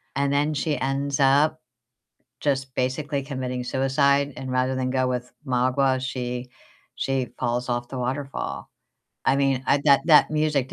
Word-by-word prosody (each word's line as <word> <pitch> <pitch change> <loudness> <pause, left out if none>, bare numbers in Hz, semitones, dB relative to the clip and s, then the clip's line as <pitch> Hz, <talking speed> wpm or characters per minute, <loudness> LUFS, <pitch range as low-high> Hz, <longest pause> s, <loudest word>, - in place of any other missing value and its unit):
and 140 0 +1
then 145 +2 +1
she 150 0 -1
ends 140 +1 -1
up 145 +3 +3 0.8
just 135 -2 -1
basically 140 +2 -1
committing 130 -3 -4
suicide. 140 +2 +1
And 130 -1 -5
rather 130 +1 +1
than 130 0 -1
go 130 -1 +1
with 125 0 -3
Magua, 130 +1 +2
she 125 -1 -4 0.5
she 135 -2 -1
falls 120 0 -1
off 120 0 -2
the 130 - -6
waterfall. 135 +3 -4 0.6
I 135 - +3
mean, 135 -2 +1
I 140 - +4
that 140 -2 +6
that 155 -2 +6
music, 150 -4 0
135 Hz, 150 wpm, -24 LUFS, 130-140 Hz, 0.8 s, that